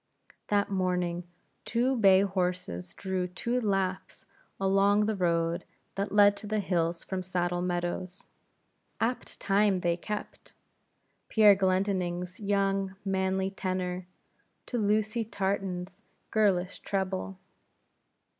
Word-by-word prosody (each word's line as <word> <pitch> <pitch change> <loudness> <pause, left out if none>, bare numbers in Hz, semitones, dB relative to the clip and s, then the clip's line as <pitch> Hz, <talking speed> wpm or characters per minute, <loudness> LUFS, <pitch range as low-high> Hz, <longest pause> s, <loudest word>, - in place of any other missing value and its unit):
That 205 -1 +1
morning, 180 -2 0 0.4
two 245 +3 +1
bay 195 -5 +6
horses 180 - -2
drew 190 -2 -2
two 235 +7 -2
Laughs 195 -3 -2 0.3
along 195 +2 +3
the 220 0 0
road 170 -1 0 0.3
that 200 +1 -2
led 205 0 +6
to 210 - -7
the 215 +1 0
hills 170 -3 0
from 190 -1 -3
Saddle 175 -1 -1
Meadows. 175 +1 -3 0.7
Apt 235 +3 -2
time 200 0 +3
they 175 -2 +1
kept; 210 +4 -6 0.8
Pierre 215 -2 +7
Glendinning's 185 -2 0
young, 195 -1 0
manly 190 0 0
tenor, 185 -1 -3 0.6
to 245 - -2
Lucy 215 +2 +1
Tartan's 190 -3 -3 0.3
girlish 195 -4 +2
treble. 190 -1 -2
190 Hz, 110 wpm, -29 LUFS, 180-205 Hz, 0.8 s, Pierre